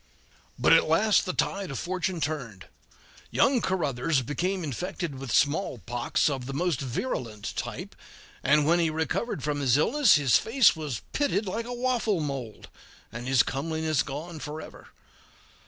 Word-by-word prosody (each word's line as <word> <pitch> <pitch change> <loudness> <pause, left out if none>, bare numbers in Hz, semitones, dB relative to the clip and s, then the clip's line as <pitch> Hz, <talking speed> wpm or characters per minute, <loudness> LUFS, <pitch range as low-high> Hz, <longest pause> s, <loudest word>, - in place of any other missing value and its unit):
But - - +5
at - - +5
last 205 +6 +4
the - - +1
tide 195 0 -1
of 135 - -4
fortune 180 +1 -2
turned; 135 -11 -4 0.6
young 265 -3 +3
Caruthers 145 -7 0
became 180 +8 -2
infect 175 +6 -4
with 135 -4 -7
smallpox 120 - +1
of 135 -4 -2
the 135 - -5
most 170 -3 0
virulent 120 - -4
type, - - -5 0.5
and 150 +2 +4
when 170 +3 +3
he 165 -1 +2
recovered 160 - -2
from 150 -1 -1
his 135 -2 +3
illness 240 - +4
his 140 -5 +4
face 235 -1 +4
was 150 -8 -5
pitted 250 -8 +1
like 225 +5 -3
a - - -5
waffle 240 -6 0
mold, 135 -7 -5 0.4
and 120 +2 -6
his 130 -2 +4
comeliness 160 +1 -1
gone 155 +4 -6
forever. 150 +1 -8
155 Hz, 150 wpm, -27 LUFS, 135-185 Hz, 0.6 s, But